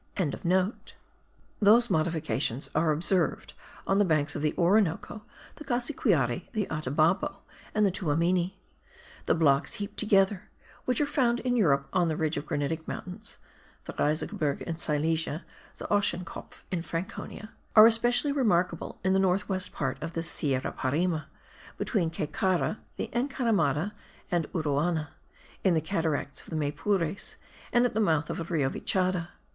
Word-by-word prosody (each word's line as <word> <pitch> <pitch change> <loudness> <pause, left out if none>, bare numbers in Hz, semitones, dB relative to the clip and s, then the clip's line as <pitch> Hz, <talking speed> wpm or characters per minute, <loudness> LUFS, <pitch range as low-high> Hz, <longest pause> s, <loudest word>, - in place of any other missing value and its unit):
Those 230 +4 +6
modifications 155 -5 0
are 155 +1 +2
observed 170 +3 0 0.3
on 195 +1 +2
the - - +6
banks 155 -5 +1
of - - -3
the 150 0 0
Orinoco, 195 +2 +2 0.4
the 300 - -8
Cassiquiare, 235 - 0
the 215 -3 0
Atabapo, 155 +6 +1 0.4
and 210 0 +4
the 195 - +3
Tuamini. 175 0 +1 0.7
The - - +4
blocks 145 -3 +2
heaped 205 0 -6
together, 195 -1 +2 0.4
which 250 -2 +1
are 295 - +3
found 245 -4 +1
in 250 -1 0
Europe 140 - +3
on 175 -2 +3
the 155 -1 -1
ridge 155 -1 0
of 145 - -4
granitic 155 +3 -2
mountains 180 0 -6 0.5
(the - - -6
Riesengebirge 150 -1 -1
in 165 -1 -4
Silesia, 160 +1 -1 0.3
the - - -7
Ochsenkopf 185 -4 -1
in 180 -3 -1
Franconia), 175 +6 -6 0.2
are 215 0 +11
especially 240 +5 +4
remarkable 180 - 0
in 190 0 +2
the 190 - +3
north 195 +2 +2
west 185 -2 -1
part 135 -1 -3
of 165 +2 -5
the 165 - -2
Sierra 135 -5 -1
Parime, 155 +4 -1 0.5
between 185 -8 0
Caycara, 180 +6 -1 0.2
the - - -4
Encaramada 220 - +1 0.4
and 170 -3 0
Uruana, 155 0 0 0.5
in 185 -3 +4
the - - +3
cataracts 160 -4 -2
of - - -14
the - - -4
Maypures 155 +5 -1 0.4
and 240 +1 +4
at 245 - 0
the 220 - 0
mouth 165 -7 +2
of - - -4
the 165 - -3
Rio 155 -5 0
Vichada. 185 -2 0
175 Hz, 145 wpm, -28 LUFS, 155-205 Hz, 0.7 s, are